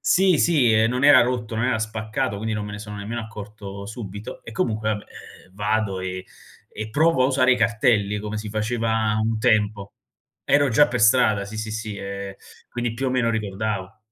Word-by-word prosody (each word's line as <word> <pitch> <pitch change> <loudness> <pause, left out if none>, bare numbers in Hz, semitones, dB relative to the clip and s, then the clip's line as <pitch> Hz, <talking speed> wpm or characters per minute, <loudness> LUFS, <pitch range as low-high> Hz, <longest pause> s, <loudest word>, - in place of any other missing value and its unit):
Sì, 185 -2 +4
sì, 145 -8 +4
ehm, 110 +1 +4
non 125 +1 -2
era 140 -3 +8
rotto, 120 -2 -2
non 115 +2 0
era 125 -3 +1
spaccato, 110 -2 -3
quindi 110 +2 -3
non 105 -1 -3
me 105 - -7
ne 105 - -6
sono 105 -1 -8
nemmeno 110 +4 -4
accorto 105 -2 -9
subito 105 -1 -8
e, 115 - -9
comunque, 110 -1 -1
vabbè, 105 -1 -3 0.4
ehm, 90 - -25
vado 105 -1 -1
e 95 0 -5 0.5
e 110 0 -5
provo 155 +2 +3
a - - +4
usare 130 -1 +4
i - - +2
cartelli 110 -3 +2
come 105 +1 -5
si 105 0 -5
faceva 110 0 0
un 110 0 0
tempo. 105 -3 +1 0.5
Ero 145 0 +3
già 120 +6 +5
per 120 0 -2
strada, 110 -2 +4
sì, 105 +2 -8
sì, 110 0 -4
sì, 110 -1 -5
ehm, 100 0 -6 0.3
quindi, 120 -1 -3
più 130 +3 -2
o - - 0
meno, 125 -2 +1
ricordavo. 105 -1 -3
110 Hz, 200 wpm, -23 LUFS, 105-120 Hz, 0.5 s, era